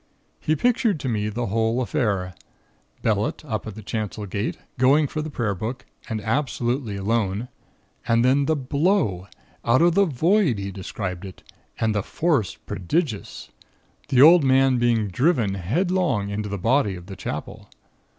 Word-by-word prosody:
He 155 Hz, -, 0 dB
pictured 235 Hz, -, +1 dB
to -, -, -3 dB
me 105 Hz, -3 st, -1 dB
the 120 Hz, +3 st, -3 dB
whole 115 Hz, +3 st, 0 dB
affair 105 Hz, -9 st, -1 dB, 0.7 s
Bellett, 110 Hz, +6 st, 0 dB
up 110 Hz, -6 st, -4 dB
at 110 Hz, -, -7 dB
the 110 Hz, -, -9 dB
chancel 105 Hz, 0 st, -4 dB
gate, 100 Hz, +3 st, -3 dB, 0.2 s
going 140 Hz, +4 st, +5 dB
for 155 Hz, +2 st, -3 dB
the 155 Hz, -, -5 dB
prayer 115 Hz, -8 st, -1 dB
book, 115 Hz, +7 st, -5 dB, 0.2 s
and 110 Hz, -2 st, -2 dB
absolutely 120 Hz, -1 st, -1 dB
alone; 105 Hz, +2 st, -1 dB, 0.6 s
and 115 Hz, 0 st, +3 dB
then 135 Hz, +2 st, +3 dB
the 160 Hz, -, +2 dB
blow, 140 Hz, -, 0 dB, 0.4 s
out 125 Hz, +7 st, +4 dB
of 175 Hz, 0 st, +4 dB
the 200 Hz, +3 st, +4 dB
Void, 165 Hz, -, +2 dB
he 100 Hz, 0 st, -4 dB
described 95 Hz, -1 st, -5 dB
it; 95 Hz, -2 st, -10 dB, 0.4 s
and 110 Hz, -1 st, +1 dB
the 105 Hz, -, 0 dB
force 135 Hz, -, 0 dB
prodigious 115 Hz, -, -3 dB, 0.6 s
the 130 Hz, +1 st, +5 dB
old 165 Hz, +1 st, +8 dB
man 130 Hz, -1 st, +4 dB
being 115 Hz, -3 st, +2 dB
driven 120 Hz, -, +1 dB
headlong 135 Hz, -, 0 dB
into 105 Hz, +1 st, -3 dB
the 100 Hz, -, -3 dB
body 115 Hz, 0 st, +1 dB
of 90 Hz, -1 st, -10 dB
the 95 Hz, 0 st, -8 dB
Chapel. 90 Hz, -, -6 dB
115 Hz, 160 wpm, -23 LUFS, 100-145 Hz, 0.7 s, old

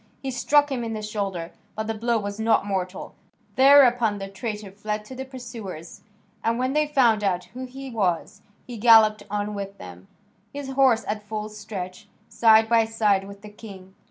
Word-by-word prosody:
He 265 Hz, -, -3 dB
struck 290 Hz, +4 st, +2 dB
him 250 Hz, -3 st, -2 dB
in 225 Hz, -1 st, -4 dB
the 215 Hz, -1 st, -5 dB
shoulder, 195 Hz, -5 st, -4 dB, 0.2 s
but 220 Hz, -, -3 dB
the 225 Hz, -, -2 dB
blow 230 Hz, +2 st, 0 dB
was 205 Hz, 0 st, -5 dB
not 220 Hz, -2 st, +2 dB
mortal. 190 Hz, -2 st, -4 dB, 0.4 s
Thereupon 250 Hz, -5 st, +5 dB
the 195 Hz, -1 st, -6 dB
traitor 210 Hz, 0 st, -6 dB
fled 210 Hz, +1 st, -5 dB
to 260 Hz, -, -10 dB
the 265 Hz, +1 st, -6 dB
pursuers, 230 Hz, -, -9 dB, 0.4 s
and 230 Hz, +1 st, +1 dB
when 255 Hz, +2 st, -1 dB
they 300 Hz, 0 st, +2 dB
found 240 Hz, -7 st, +3 dB
out 180 Hz, -3 st, 0 dB
who 255 Hz, +1 st, -6 dB
he 265 Hz, +1 st, -9 dB
was 185 Hz, -7 st, -1 dB, 0.2 s
he 245 Hz, -2 st, -8 dB
galloped 215 Hz, -1 st, +6 dB
on 210 Hz, +1 st, -2 dB
with 200 Hz, -1 st, -6 dB
them, 90 Hz, +1 st, -12 dB, 0.4 s
his 280 Hz, -1 st, -6 dB
horse 260 Hz, -4 st, +3 dB
at 210 Hz, 0 st, -2 dB
full 210 Hz, 0 st, -5 dB
stretch, 210 Hz, -1 st, -8 dB, 0.2 s
side 220 Hz, -1 st, +4 dB
by 230 Hz, 0 st, +4 dB
side 210 Hz, -3 st, +1 dB
with 200 Hz, 0 st, -12 dB
the 210 Hz, -, -9 dB
king. 200 Hz, -3 st, -12 dB
215 Hz, 185 wpm, -24 LUFS, 200-240 Hz, 0.4 s, galloped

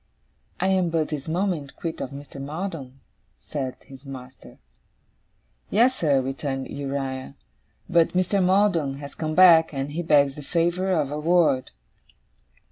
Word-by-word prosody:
'I 190 Hz, -, +1 dB
am 185 Hz, -2 st, +2 dB
but 160 Hz, -2 st, 0 dB
this 150 Hz, -2 st, -5 dB
moment 165 Hz, -4 st, -2 dB
quit 165 Hz, -1 st, -5 dB
of -, -, -3 dB
Mr. 140 Hz, 0 st, -9 dB
Maldon,' 145 Hz, -3 st, -6 dB, 0.4 s
said 135 Hz, -4 st, -5 dB
his 135 Hz, -1 st, -14 dB
master. 130 Hz, -2 st, -11 dB, 1.1 s
'Yes, 240 Hz, +5 st, +4 dB
sir,' 145 Hz, -, +2 dB
returned 135 Hz, 0 st, -4 dB
Uriah; 135 Hz, -1 st, -4 dB, 0.5 s
'but 170 Hz, -1 st, +3 dB
Mr. 185 Hz, +2 st, +2 dB
Maldon 180 Hz, -7 st, +2 dB
has 140 Hz, 0 st, -9 dB
come 155 Hz, -1 st, -3 dB
back, 170 Hz, -3 st, +7 dB
and 135 Hz, +1 st, -3 dB
he 165 Hz, +4 st, -3 dB
begs 145 Hz, -4 st, +4 dB
the 150 Hz, -, -9 dB
favour 175 Hz, +5 st, 0 dB
of 150 Hz, -6 st, +1 dB
a 150 Hz, -, -3 dB
word. 160 Hz, -5 st, +2 dB
150 Hz, 140 wpm, -24 LUFS, 135-175 Hz, 1.1 s, back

